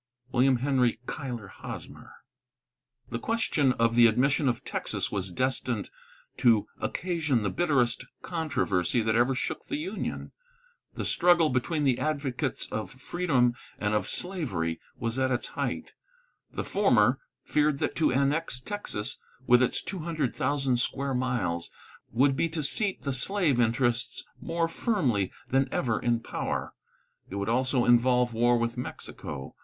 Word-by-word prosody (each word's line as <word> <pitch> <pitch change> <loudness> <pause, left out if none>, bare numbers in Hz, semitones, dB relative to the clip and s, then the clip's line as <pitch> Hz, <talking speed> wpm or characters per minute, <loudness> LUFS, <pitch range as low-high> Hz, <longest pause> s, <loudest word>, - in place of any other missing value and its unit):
WILLIAM 130 +1 +4
HENRY 125 -3 +1
CUYLER 125 -8 -5
HOSMER. - - -8 1.0
The 115 - -2
question 150 - +1
of 115 -1 +2
the 120 0 +7
admission 135 +5 +2
of 120 - -2
Texas - - -2
was 95 -2 -2
destined 130 0 -1 0.5
to 120 -4 +4
occasion 155 - 0
the 100 - 0
bitterest 125 -8 +2 0.2
controversy 130 - 0
that 110 0 +1
ever 120 +4 +3
shook - - -3
the 295 - -2
Union. 320 +5 -4 0.6
The - - -3
struggle 175 -3 +4
between 145 +5 0
the 130 -3 +2
advocates 145 -3 -1
of 110 - -3
freedom 135 -2 +1 0.2
and 105 0 -1
of 105 - +1
slavery 110 - -2 0.2
was 115 +2 -2
at 130 0 +2
its 125 -1 -1
height; - - -3 0.6
the - - -3
former - - +3 0.2
feared 150 -1 +2
that - - -2
to 160 - +3
annex 140 +1 +1
Texas, 170 - -5 0.3
with 125 0 +6
its 125 - +1
two 190 - -5
hundred 155 -5 -2
thousand 135 -3 +1
square 135 +3 -1
miles, 120 -10 -1 0.4
would 135 +4 +3
be 165 - +1
to 160 -1 -3
seat 195 +7 +1
the 140 - -1
slave 150 -1 +1
interests 120 +1 +1 0.2
more 165 0 0
firmly 145 - 0 0.2
than 135 +1 +2
ever 115 -3 0
in 120 -1 +1
power. - - -3 0.6
It 95 - -6
would 100 +2 -2
also 130 +1 +2
involve 120 0 +4
war 120 +2 +3
with 115 +1 -1
Mexico. 70 - -7
130 Hz, 145 wpm, -28 LUFS, 120-150 Hz, 1.0 s, the